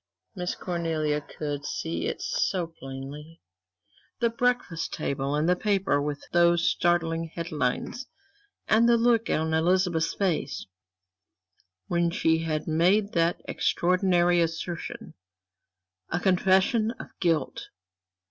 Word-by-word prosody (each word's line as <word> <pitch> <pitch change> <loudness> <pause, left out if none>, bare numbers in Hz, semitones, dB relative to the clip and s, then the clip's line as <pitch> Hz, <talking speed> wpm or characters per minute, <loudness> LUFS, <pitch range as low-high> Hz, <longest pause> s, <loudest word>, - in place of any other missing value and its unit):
Miss 180 -3 -3
Cornelia 160 -4 -1
could 145 -1 -5
see 165 - -3
it 470 - -4
so 195 - 0
plainly; 145 +1 -9 0.8
the 235 -1 +2
breakfast 245 -8 -1
table 140 +1 -2
and 150 +2 +1
the 180 - +4
paper 195 -7 +1
with 145 0 -3
those 170 0 +4
startling 165 -1 +1
headlines, 160 - -3 0.6
and 230 +2 +4
the 235 - +5
look 230 -1 +2
on 160 0 0
Elizabeth's 175 0 +2
face, 190 -5 -1 1.2
when 170 - +1
she 160 -1 +2
had 155 -2 -2
made 185 +6 +3
that 170 0 +1
extraordinary 175 -1 +2
assertion. 165 +1 -4 1.0
A - - -1
confession 190 +5 +3
of - - -8
guilt! 165 -6 0
170 Hz, 110 wpm, -27 LUFS, 160-190 Hz, 1.2 s, the